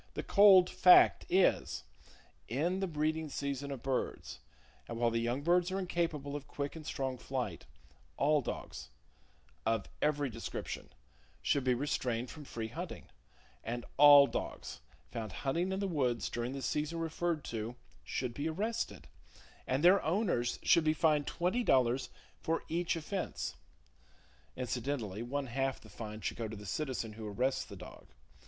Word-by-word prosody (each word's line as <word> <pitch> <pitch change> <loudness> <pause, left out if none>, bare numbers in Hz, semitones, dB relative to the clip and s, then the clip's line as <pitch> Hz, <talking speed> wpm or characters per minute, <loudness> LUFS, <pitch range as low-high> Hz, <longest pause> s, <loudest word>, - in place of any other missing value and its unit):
The - - -3
cold 195 -3 +7
fact 180 0 +6
is: 190 0 +2 0.6
In 170 +10 0
the 195 - 0
breeding 155 0 -1
season 140 0 -3
of 135 -4 -6
birds, 130 -1 -3 0.5
and 115 - -5
while 120 0 +2
the 115 0 0
young 120 +4 -1
birds 175 +2 +3
are 190 - -2
incapable 165 -6 -2
of 145 -1 -6
quick 140 +1 -4
and 160 - -8
strong 130 -4 -3
flight, 125 -11 -4 0.5
all 150 +1 +3
dogs, - - -6 0.7
of 115 - 0 0.2
every 145 -1 +1
description, 115 +1 -6 0.5
should 140 - +2
be 125 -1 +3
restrained 125 -3 -1
from 150 -2 -10
free 115 -4 -5
hunting; - - -7 0.5
and 120 +1 -4
all 145 -1 +10
dogs - - -5 0.3
found 110 -3 -4
hunting 170 +8 +1
in 190 - -1
the 200 - -1
woods 130 -9 0
during 120 +2 -3
the 135 -1 -5
season 150 +2 -1
referred 165 -1 -1
to 115 +1 -4 0.3
should 120 - -3
be 145 +5 -2
arrested, 215 +8 -3 0.6
and 130 +4 0
their 185 +3 +7
owners 165 - 0
should 170 - +5
be 155 0 +2
fined 150 -2 +2
twenty 185 +8 0
dollars 130 - +2 0.3
for 165 +1 -1
each 170 +1 0
offense. 175 +4 -4 1.0
Incidentally, 125 -4 -3
one 135 +4 -2
half 135 +2 -1
the 110 - -16
fine 105 +1 -7
should - - -3
go 115 -1 -3
to 110 - -7
the 105 - -10
citizen 120 0 -3
who 110 0 -7
arrests 130 +6 0
the 100 - -10
dog. 90 -1 -12
140 Hz, 155 wpm, -33 LUFS, 120-165 Hz, 1.0 s, all